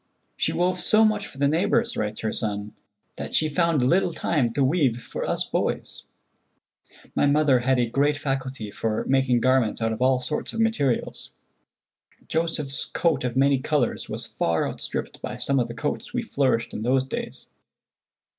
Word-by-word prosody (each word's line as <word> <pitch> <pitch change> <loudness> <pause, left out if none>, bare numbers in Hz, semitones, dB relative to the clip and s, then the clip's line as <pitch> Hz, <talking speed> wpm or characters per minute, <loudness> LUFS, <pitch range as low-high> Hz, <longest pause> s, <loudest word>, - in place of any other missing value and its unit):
"She - - 0
wove 180 +1 0
so 215 +4 +6
much 210 -2 0
for - - -14
the 140 +1 +2
neighbors," 205 +10 +1
writes 105 0 -3
her 110 - -1
son, 105 -1 -3 0.4
"that - - -5
she 155 - +3
found 155 -2 +1
little 175 +6 +2
time 130 -8 0
to 140 - +1
weave 135 -4 +2
for - - -6
us - - -1
boys. - - -3 1.1
My - - +2
mother 140 -3 +4
had 130 +2 +1
a 120 - +2
great 145 +5 +1
faculty 135 -6 -3
for 110 0 -2
making 130 -3 +2
garments 130 -3 +2
out 115 -1 0
of 110 - -7
all 130 0 +3
sorts 140 +4 -3
of 225 - -4
materials. 220 - 0 1.0
Joseph's 160 -4 -1
coat 165 -6 0
of 125 0 -2
many 135 0 +4
colors 145 -1 -1
was - - -3
far 85 -1 0
outstripped - - -5
by 125 - -5
some 135 +2 +1
of 120 - 0
the 115 - -8
coats 145 - -4
we 245 - 0
flourished 135 - 0
in - - -4
those 130 +3 +2
days." 135 - -6
135 Hz, 175 wpm, -24 LUFS, 120-155 Hz, 1.1 s, so